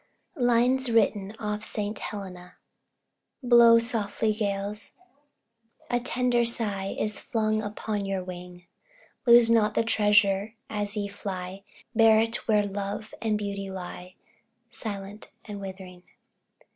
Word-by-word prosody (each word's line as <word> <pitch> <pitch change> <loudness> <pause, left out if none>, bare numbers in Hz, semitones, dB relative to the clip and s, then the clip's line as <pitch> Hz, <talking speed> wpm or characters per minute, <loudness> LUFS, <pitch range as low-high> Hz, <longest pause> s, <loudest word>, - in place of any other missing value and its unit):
LINES 245 0 +2
WRITTEN 210 -2 +1
OFF 210 0 -3
ST. 210 0 -2
HELENA. 180 -3 -8 0.9
Blow 235 -1 +7
softly, 220 -2 0
gales! 205 0 -2 1.0
a 245 - +2
tender 245 0 +1
sigh 205 -4 0
Is 210 -1 +1
flung 215 -1 0
upon 205 -1 -4
your 195 -1 -2
wing; 180 -1 -9 0.6
Lose 235 -1 +8
not 215 -2 +3
the - - +3
treasure 210 -1 +2 0.2
as 205 0 -3
ye 205 -1 -1
fly, 195 -1 -6 0.3
Bear 220 -1 +6
it 225 +1 -1
where 210 -2 +3
love 200 +2 -5
and 220 -2 +1
beauty 200 -1 -4
lie, 180 -1 -8 0.6
Silent 205 -1 -7 0.2
and 205 -2 -7
withering. 190 -2 -9
210 Hz, 120 wpm, -27 LUFS, 195-225 Hz, 1.0 s, Lose